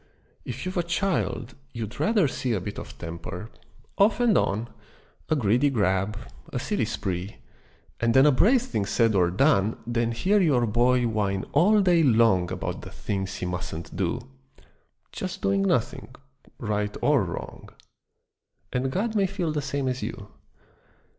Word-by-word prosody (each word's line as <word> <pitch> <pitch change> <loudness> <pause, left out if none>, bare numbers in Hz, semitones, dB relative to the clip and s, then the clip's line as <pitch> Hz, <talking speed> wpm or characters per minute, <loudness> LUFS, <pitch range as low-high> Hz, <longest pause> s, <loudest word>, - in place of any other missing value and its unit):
If 125 +4 -6
you've 185 0 -3
a - - +4
child, 170 - -1 0.2
you'd 115 -2 -6
rather 210 -7 +3
see 130 -2 -2
A 105 - 0
bit 100 +3 -6
of - - -10
temper, 85 +5 -7 0.5
off 205 +3 +4
and 240 -3 +3
on, 110 +4 +1 0.6
A 155 - +3
greedy 125 +2 +2
grab, 100 -3 0 0.3
a - - -3
silly - - -1
spree 95 +2 -4 0.6
And 115 -1 +1
then 130 +1 +7
a 150 - +6
brave 225 - +4
thing 105 - -2
said 115 -1 +2
or 90 -3 +3
done 105 - +2
Than 120 -1 0
hear 190 - +2
your 135 -9 +3
boy 120 +3 +2
whine 105 -4 -1
all 210 +4 +4
day 175 -3 +4
long 110 - +3
About 95 0 -4
the - - -9
things 95 -1 -4
he - - -4
musn't 85 -2 -5
do: - - -1 0.9
Just - - -6
doing 100 0 +2
nothing, 110 +4 0 0.5
right 105 -2 -2
or - - +4
wrong: - - -7 1.0
And 130 +1 0
God 215 - -1
may 200 -3 +2
feel 180 -4 -2
the 150 -1 -1
same 140 -1 -2
as 130 0 -2
you. - - -6
120 Hz, 160 wpm, -26 LUFS, 100-155 Hz, 1.0 s, then